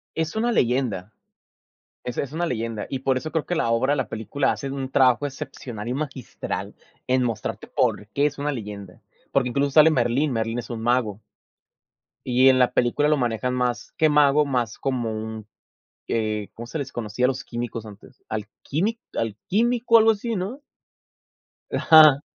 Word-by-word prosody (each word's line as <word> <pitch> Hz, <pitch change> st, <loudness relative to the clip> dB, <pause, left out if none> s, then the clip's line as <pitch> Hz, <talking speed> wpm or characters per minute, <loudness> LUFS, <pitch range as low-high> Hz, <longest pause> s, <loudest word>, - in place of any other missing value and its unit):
Es 160 Hz, +6 st, -2 dB
una 235 Hz, +1 st, +1 dB
leyenda, 120 Hz, -, 0 dB, 0.9 s
es 125 Hz, -, -5 dB
es 140 Hz, -1 st, -2 dB
una 170 Hz, +2 st, -1 dB
leyenda 115 Hz, -5 st, -3 dB
y 135 Hz, -, -3 dB
por 130 Hz, 0 st, +1 dB
eso 155 Hz, +4 st, -5 dB
creo 160 Hz, -, 0 dB
que 175 Hz, -, -2 dB
la 160 Hz, -, 0 dB
obra, 130 Hz, +5 st, +2 dB
la 135 Hz, -, -1 dB
película 125 Hz, +5 st, -1 dB
hacen 135 Hz, -1 st, -5 dB
un 135 Hz, -1 st, -4 dB
trabajo 130 Hz, 0 st, +3 dB
excepcional 130 Hz, -6 st, -6 dB
y -, -, -1 dB
magistral 135 Hz, -3 st, -5 dB, 0.3 s
en 130 Hz, 0 st, +2 dB
mostrarte 115 Hz, -3 st, -3 dB
por 105 Hz, -, 0 dB
qué 140 Hz, +6 st, 0 dB
es 145 Hz, -1 st, -1 dB
una 145 Hz, 0 st, -1 dB
leyenda. 100 Hz, -5 st, -8 dB, 0.3 s
Porque 125 Hz, -2 st, +2 dB
incluso 140 Hz, +2 st, 0 dB
sale 155 Hz, +2 st, +7 dB
Merlín, 130 Hz, +2 st, +1 dB
Merlín 115 Hz, +1 st, -1 dB
es -, -, -8 dB
un 115 Hz, -2 st, -4 dB
mago. 115 Hz, -3 st, 0 dB, 1.1 s
Y 130 Hz, +2 st, +5 dB
en 130 Hz, -, +5 dB
la 125 Hz, -, +3 dB
película 125 Hz, +5 st, +2 dB
lo 150 Hz, -1 st, +3 dB
manejan 125 Hz, 0 st, -1 dB
más 125 Hz, -4 st, -2 dB
que 155 Hz, -1 st, +4 dB
mago, 150 Hz, 0 st, +4 dB
más 120 Hz, -5 st, -1 dB
como 125 Hz, -4 st, -1 dB
un, 110 Hz, 0 st, -6 dB, 0.6 s
eh, 110 Hz, -2 st, -1 dB
¿cómo 115 Hz, +1 st, -8 dB
se 160 Hz, -, -5 dB
les 140 Hz, -3 st, -4 dB
conocía 115 Hz, +1 st, -1 dB
a -, -, +5 dB
los 130 Hz, 0 st, -2 dB
químicos 120 Hz, -2 st, -5 dB
antes? 100 Hz, -1 st, -15 dB
Alquímic 150 Hz, -, -3 dB, 0.2 s
alquímico 230 Hz, -, +2 dB
algo 225 Hz, 0 st, +6 dB
así, 225 Hz, +2 st, -3 dB
¿no? 205 Hz, +10 st, -4 dB, 1.1 s
Ajá. 155 Hz, -3 st, +7 dB
130 Hz, 170 wpm, -24 LUFS, 115-150 Hz, 1.1 s, sale